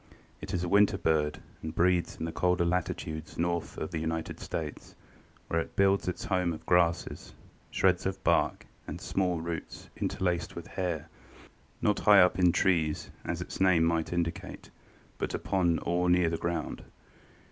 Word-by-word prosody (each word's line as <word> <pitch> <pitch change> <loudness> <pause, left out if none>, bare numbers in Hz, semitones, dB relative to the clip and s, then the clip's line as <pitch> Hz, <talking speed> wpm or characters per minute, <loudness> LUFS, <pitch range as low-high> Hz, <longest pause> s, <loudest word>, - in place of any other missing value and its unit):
It - - -6
is 90 - -1
a - - -1
winter 100 +1 +4
bird 75 -4 +1 0.2
and 80 0 -6
breeds 90 0 +2
in 80 - -4
the 85 - -3
colder 90 0 +1
latitudes 80 -2 -2
north 85 0 -1
of 80 - -4
the 80 - -2
United 80 +1 -3
States, 80 -3 -5 0.5
where 85 - +1
it - - -8
builds 100 -1 +3
its 90 - -3
home 90 -3 +1
of 80 - -9
grasses, 90 -1 +1 0.3
shreds 95 -1 +2
of 95 0 -4
bark - - +2 0.2
and - - -5
small 90 -3 0
roots 85 0 -6
interlaced 90 -3 -1
with 85 - -6
hair, 90 -5 -3 0.8
not 105 -2 +2
high 105 -2 +7
up 90 +1 +3
in 90 -1 +5
trees, 80 -4 +1
as - - -3
its - - -6
name 90 -4 +5
might 80 -1 +1
indicate, 85 -2 -3 0.5
but - - -2
upon 85 -4 +1
or 90 +1 +1
near 90 -2 +4
the 85 - -1
ground. 85 -2 -3
85 Hz, 165 wpm, -30 LUFS, 80-90 Hz, 0.8 s, high